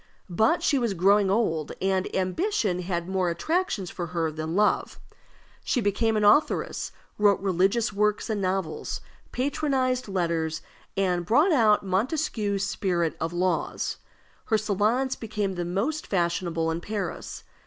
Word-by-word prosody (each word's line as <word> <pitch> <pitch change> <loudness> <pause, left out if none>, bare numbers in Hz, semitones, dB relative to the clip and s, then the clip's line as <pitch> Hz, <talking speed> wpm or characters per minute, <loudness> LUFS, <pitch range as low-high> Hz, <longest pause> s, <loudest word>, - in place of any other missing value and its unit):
But 220 - +2
she 280 - +3
was 230 -5 -1
growing 195 +3 +4
old, 180 -8 0
and 190 -1 +1
ambition 190 - 0
had 175 -1 -3
more 190 -2 0
attractions 220 - -1
for 175 -2 -4
her 165 -2 -1
than 155 +2 -4
love. 210 +1 +1 0.6
She 255 - 0
became 220 +1 +1
an 210 - +1
authoress, 210 +9 +2 0.3
wrote 205 -1 +4
religious 195 +4 +1
works 210 +1 +1
and 215 -3 -2
novels, 185 -3 -2 0.3
patronized 260 -2 0
letters, 165 -4 -1 0.3
and 180 -3 +1
brought 285 - +4
out 220 -8 +4
Montesquieu's 205 - 0
Spirit 175 -4 -1
of 165 +1 -2
Laws. 180 +1 -1 0.5
Her 220 - +2
salons 215 +6 +1
became 210 -3 -3
the 175 -1 -3
most 225 - -2
fashionable 170 -3 0
in 165 +1 -3
Paris. 200 -3 -5
195 Hz, 135 wpm, -26 LUFS, 175-225 Hz, 0.6 s, growing